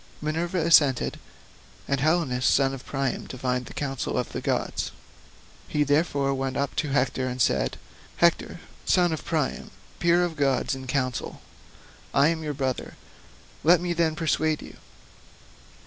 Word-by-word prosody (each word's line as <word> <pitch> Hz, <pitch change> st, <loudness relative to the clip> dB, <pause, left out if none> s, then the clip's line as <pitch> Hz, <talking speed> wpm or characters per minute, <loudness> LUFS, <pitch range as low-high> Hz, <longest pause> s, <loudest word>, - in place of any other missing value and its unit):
Minerva 165 Hz, +4 st, -2 dB
assented, 155 Hz, -6 st, +4 dB, 0.7 s
and 140 Hz, -1 st, 0 dB
Helenus 150 Hz, -5 st, +2 dB
son 135 Hz, -1 st, +3 dB
of 130 Hz, -2 st, -9 dB
Priam 135 Hz, -1 st, -2 dB
divined 125 Hz, -1 st, -2 dB
the -, -, -10 dB
counsel 135 Hz, -3 st, -2 dB
of -, -, -2 dB
the -, -, -4 dB
gods; -, -, -1 dB, 0.8 s
he 150 Hz, -, +1 dB
therefore 145 Hz, -1 st, +1 dB
went 135 Hz, -1 st, -2 dB
up 140 Hz, -1 st, -1 dB
to 155 Hz, -1 st, 0 dB
Hector 130 Hz, -1 st, 0 dB
and 125 Hz, 0 st, -4 dB
said, 65 Hz, -, +1 dB, 0.4 s
"Hector -, -, +2 dB, 0.2 s
son 175 Hz, -2 st, +3 dB
of 160 Hz, -, -5 dB
Priam, 155 Hz, -5 st, -2 dB, 0.3 s
peer 170 Hz, +1 st, +4 dB
of 170 Hz, -2 st, -4 dB
gods 140 Hz, -1 st, +1 dB
in 130 Hz, 0 st, -6 dB
counsel, 130 Hz, -2 st, -2 dB, 0.8 s
I 140 Hz, +3 st, +5 dB
am 165 Hz, -1 st, -1 dB
your 150 Hz, -2 st, -3 dB
brother, 130 Hz, -2 st, -3 dB, 0.7 s
let 170 Hz, +3 st, +6 dB
me 175 Hz, 0 st, -1 dB
then 165 Hz, -2 st, +1 dB
persuade 155 Hz, -1 st, 0 dB
you. -, -, -12 dB
145 Hz, 145 wpm, -26 LUFS, 130-160 Hz, 0.8 s, let